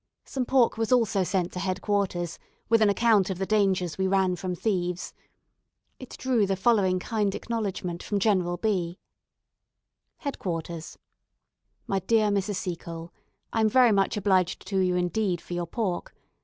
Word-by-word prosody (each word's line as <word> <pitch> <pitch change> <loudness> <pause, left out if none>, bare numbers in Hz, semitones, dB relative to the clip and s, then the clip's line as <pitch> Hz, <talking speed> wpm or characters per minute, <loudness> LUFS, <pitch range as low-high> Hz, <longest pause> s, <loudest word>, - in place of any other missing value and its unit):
Some 260 -2 -2
pork 250 -4 +3
was 225 0 -1
also 225 -6 +3
sent 180 -1 -1
to 180 - -5
head 185 0 -1
quarters, 190 -5 -1 0.3
with 230 -1 +4
an 215 - +5
account 210 -2 +3
of 190 - -2
the 190 - -1
dangers 190 -5 +1
we 190 - +2
ran 190 -1 +2
from 180 0 -4
thieves. 180 -2 -2 0.9
It 255 - -10
drew 245 -6 +1
the 195 - +1
following 190 -2 +3
kind 205 0 -1
acknowledgment 195 -6 -3
from 205 - -2
General 185 -4 +1
B: 185 -5 -1 1.2
"Head 280 -3 -5
Quarters. 165 -2 -5 0.9
"My 195 - 0
dear 215 +3 +2
Mrs. 200 0 0
Seacole, 170 -2 -6 0.4
I 225 - +1
am 220 - +4
very 250 0 +5
much 195 0 +2
obliged 190 -3 +1
to 195 -2 +1
you 180 -1 +2
indeed 180 +1 0
for 175 - -9
your 175 -1 -2
pork. 190 -2 -3
195 Hz, 160 wpm, -27 LUFS, 180-215 Hz, 1.2 s, an